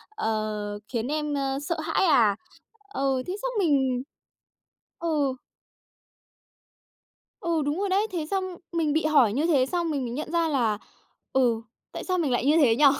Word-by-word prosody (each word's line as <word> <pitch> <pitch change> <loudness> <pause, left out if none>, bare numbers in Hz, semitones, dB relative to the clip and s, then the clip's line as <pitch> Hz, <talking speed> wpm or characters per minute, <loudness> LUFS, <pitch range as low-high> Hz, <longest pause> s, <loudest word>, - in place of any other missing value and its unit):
ờ, 215 - -2
khiến 235 -1 -2
em, 300 0 -1
ơ, 275 -1 -1
sợ 335 +3 -2
hãi 345 - +1
à?" 235 - +5 0.6
Ừ, 270 -1 +1
thế 365 - -3
xong - - -1
mình 265 -7 +2 1.0
Ừ. 295 -5 +1 2.1
Ừ, 335 -2 0
đúng 295 +6 -1
rồi 405 - 0
đấy. 400 +3 +2
Thế 335 -4 -2
xong 385 -1 +1 0.3
mình 320 -3 +1
bị 315 0 +1
hỏi 275 -9 +4
như 290 +7 +1
thế 275 -6 +4
xong 340 +3 -1
mình 285 -3 -1
mới 235 - -4
nhận 300 +5 -4
ra 335 -1 +2
là, 240 -8 +1 0.6
ừ, 240 -4 +3 0.3
"Tại - - -6
sao 370 -1 0
mình 300 -7 0
lại 245 +1 +1
như 305 +3 +5
thế 255 -8 +5
nhỉ? 290 +4 +4
290 Hz, 170 wpm, -26 LUFS, 250-330 Hz, 2.1 s, à